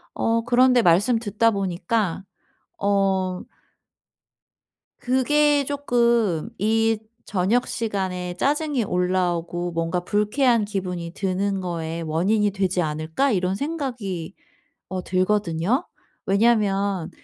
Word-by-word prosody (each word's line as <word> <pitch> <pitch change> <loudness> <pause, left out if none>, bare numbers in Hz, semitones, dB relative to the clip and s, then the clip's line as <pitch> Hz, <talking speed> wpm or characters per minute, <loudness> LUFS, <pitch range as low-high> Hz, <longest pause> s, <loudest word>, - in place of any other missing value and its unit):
어 230 0 +1
그런데 250 +1 +4
말씀 205 +6 +3
듣다 225 +1 +1
보니까 195 0 -1 0.6
어 195 -2 0 1.6
그게 290 +3 +2
조금 235 - +1
'이 225 +1 +2 0.3
저녁 210 +6 +1
시간에 190 -5 -3
짜증이 290 - 0
올라오고 175 -2 -1
뭔가 165 +1 -1
불쾌한 215 +4 +2
기분이 180 -4 -4
드는 195 +1 -1
거의 165 -2 -4
원인이 200 +7 +1
되지 190 -2 0
않을까?' 160 - -1
이런 185 -2 0
생각이 240 - -4 0.5
어 185 -1 -4
들거든요. 185 - 0 0.4
왜냐하면 200 -4 +1
200 Hz, 220 characters per minute, -23 LUFS, 180-230 Hz, 1.6 s, 그런데